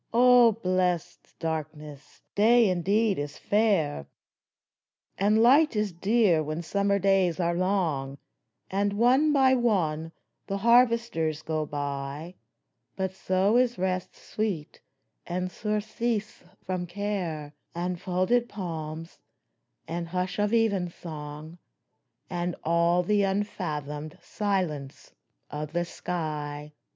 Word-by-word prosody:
O 245 -1 +7
blessed 185 -4 -2
Darkness, 150 -2 -6
Day 230 +2 +5
indeed 200 +3 +1
is 145 0 -5
fair, 195 - +1 1.1
And 210 +3 +3
Light 280 +3 +5
is 210 -1 0
dear 190 -1 +2
when 155 +2 -4
summer 200 +3 +1
days 190 -3 +2
are 170 -1 +1
long, 170 -7 -1 0.5
And 200 +1 0
one 255 +8 +4
by 265 -2 +4
one 170 -10 0 0.4
the 195 - -2
harvesters 230 -9 +2
go 155 -1 -2
by; 145 +3 -4 0.6
But 190 -1 -2
so 190 +4 +1
is 245 -1 +2
rest 185 0 -2
sweet, 200 -9 -4 0.5
and 180 +1 -2
surcease 215 +2 -2 0.2
from 185 -1 -3
care, 175 -6 -4 0.2
And 175 0 -3
folded 190 +7 +1
palms, 165 -4 -6 0.7
and 170 +1 -4
hush 180 +2 -3
of 205 0 +1
evensong, 170 -7 -2 0.7
And 175 -1 -3
all 170 +2 +2
the 205 +3 +2
unfathomed 155 -7 -3
silence 180 -10 -3 0.4
of 150 +1 -5
the 175 0 0
sky 150 -4 -5
180 Hz, 105 wpm, -27 LUFS, 160-210 Hz, 1.1 s, O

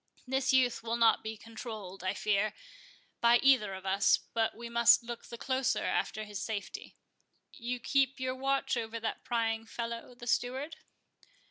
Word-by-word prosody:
This 265 0 +1
youth 255 -2 +3
will 230 0 -2
not 230 -1 +4
be 220 0 -5
controlled, 215 -5 -8
I 185 +1 -1
fear, 210 +1 +1 0.6
by 235 0 +6
either 240 -8 +4
of 190 0 -10
us; 195 +1 +4 0.2
but 225 -1 0
we 235 0 -7
must 235 0 +5
look 235 0 -7
the 235 - -8
closer 260 +1 0
after 215 - -1
his 210 -2 -6
safety. 215 -3 -5 0.6
You 250 -3 -4
keep 270 +2 +1
your 255 0 -1
watch 270 +1 0
over 230 -1 -3
that 225 0 -4
prying 225 -1 -1
fellow 235 +1 -5
the 240 - -10
steward?" 260 +6 -1
235 Hz, 160 wpm, -31 LUFS, 220-255 Hz, 0.6 s, by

